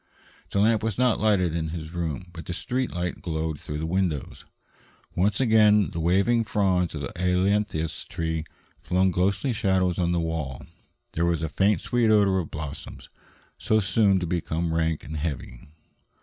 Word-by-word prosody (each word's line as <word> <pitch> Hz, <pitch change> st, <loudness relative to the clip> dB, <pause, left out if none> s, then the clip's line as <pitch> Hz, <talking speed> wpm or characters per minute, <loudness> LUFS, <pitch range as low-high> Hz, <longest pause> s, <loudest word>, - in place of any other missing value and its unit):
The 100 Hz, -, 0 dB
lamp 110 Hz, +1 st, +3 dB
was 110 Hz, -2 st, -2 dB
not 125 Hz, -2 st, +2 dB
lighted 95 Hz, -6 st, +2 dB
in 80 Hz, -1 st, -1 dB
his 80 Hz, -1 st, -6 dB
room, 85 Hz, 0 st, -3 dB
but 85 Hz, -1 st, -9 dB
the 90 Hz, -, -3 dB
street 130 Hz, +5 st, -2 dB
light 90 Hz, -1 st, -3 dB
glowed 80 Hz, -2 st, -3 dB
through 75 Hz, -, -5 dB
the 80 Hz, -, -3 dB
windows. 85 Hz, -4 st, -2 dB, 0.7 s
Once 100 Hz, +3 st, +1 dB
again 105 Hz, -5 st, +4 dB
the 85 Hz, -, -4 dB
waving 100 Hz, +8 st, +2 dB
fronds 95 Hz, -6 st, +1 dB
of 75 Hz, -, -4 dB
the 70 Hz, -, -5 dB
ailanthus 90 Hz, -2 st, 0 dB
tree 80 Hz, -1 st, -3 dB, 0.4 s
flung 95 Hz, +1 st, +2 dB
ghostly 95 Hz, +8 st, +1 dB
shadows 95 Hz, -4 st, +1 dB
on 85 Hz, -1 st, +1 dB
the 85 Hz, -, +1 dB
walls. 80 Hz, -6 st, -3 dB, 0.5 s
There 85 Hz, +1 st, 0 dB
was 85 Hz, -1 st, 0 dB
a 80 Hz, -, -1 dB
faint 100 Hz, +6 st, +2 dB
sweet 120 Hz, -2 st, +1 dB
odor 100 Hz, -3 st, +4 dB
of 85 Hz, -, -4 dB
blossoms, 75 Hz, -2 st, -7 dB, 0.5 s
so 110 Hz, -, +2 dB
soon 100 Hz, 0 st, +3 dB
to 90 Hz, -, -2 dB
become 85 Hz, -1 st, -2 dB
rank 80 Hz, -1 st, 0 dB
and 80 Hz, +1 st, -6 dB
heavy. 70 Hz, -5 st, -5 dB
90 Hz, 170 wpm, -25 LUFS, 80-100 Hz, 0.7 s, again